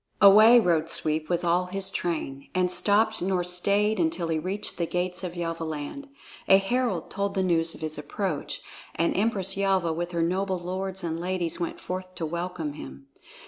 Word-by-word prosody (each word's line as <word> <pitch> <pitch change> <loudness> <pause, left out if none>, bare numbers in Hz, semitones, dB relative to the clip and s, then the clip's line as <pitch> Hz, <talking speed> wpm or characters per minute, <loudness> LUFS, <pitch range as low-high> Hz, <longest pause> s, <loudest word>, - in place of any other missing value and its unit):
Away 215 +4 +8
rode 165 -5 +1
Sweep 155 -1 +2
with 175 0 0
all 175 +2 +2
his 195 +1 -2
train, 145 -5 -3
and 180 -1 +2
stopped 220 +3 +2
nor 185 0 0
stayed 200 +4 +1
until 165 0 0
he 160 -1 0
reached 190 +5 -3
the 170 - 0
gates 180 +2 -2
of 180 -1 -5
Yelvaland. 165 - -4 0.4
A 195 - +8
herald 195 -3 -1
told 200 0 -2
the 190 - +1
news 165 -2 +1
of - - -12
his 155 -1 -4
approach, 155 +1 -4 0.3
and 170 - +1
Empress 195 -2 0
Yelva 190 -4 +1
with 175 +2 -3
her 170 -1 +1
noble 185 +2 0
lords 185 +2 -4
and 165 -1 -3
ladies 175 -1 -2
went 170 - -3
forth 185 0 -6
to 165 - -3
welcome 170 -2 -4
him. 70 - -11
180 Hz, 180 wpm, -26 LUFS, 165-195 Hz, 0.4 s, Away